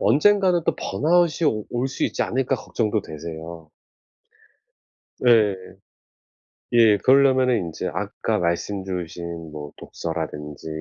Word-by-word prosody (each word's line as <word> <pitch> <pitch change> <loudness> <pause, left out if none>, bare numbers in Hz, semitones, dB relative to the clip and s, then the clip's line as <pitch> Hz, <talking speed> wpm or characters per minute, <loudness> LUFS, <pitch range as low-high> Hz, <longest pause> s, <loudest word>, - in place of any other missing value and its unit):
언젠가는 180 - +3
또 - - +1
번아웃이 170 0 +2
오 110 -1 -4
올 125 +2 -1
수 135 - -2
있지 - - -1
않을까 130 +1 0
걱정도 110 -2 -1
되세요. 80 0 -8 1.5
네. 110 -5 +4 1.2
예 115 -3 +5
그러려면은 130 0 +4
인제 85 -5 -4
아까 - - -2
말씀 90 +3 -1
주신 85 -3 -6
뭐 75 -1 -8
독서라든지 75 -3 -6
105 Hz, 245 characters per minute, -23 LUFS, 85-130 Hz, 1.5 s, 예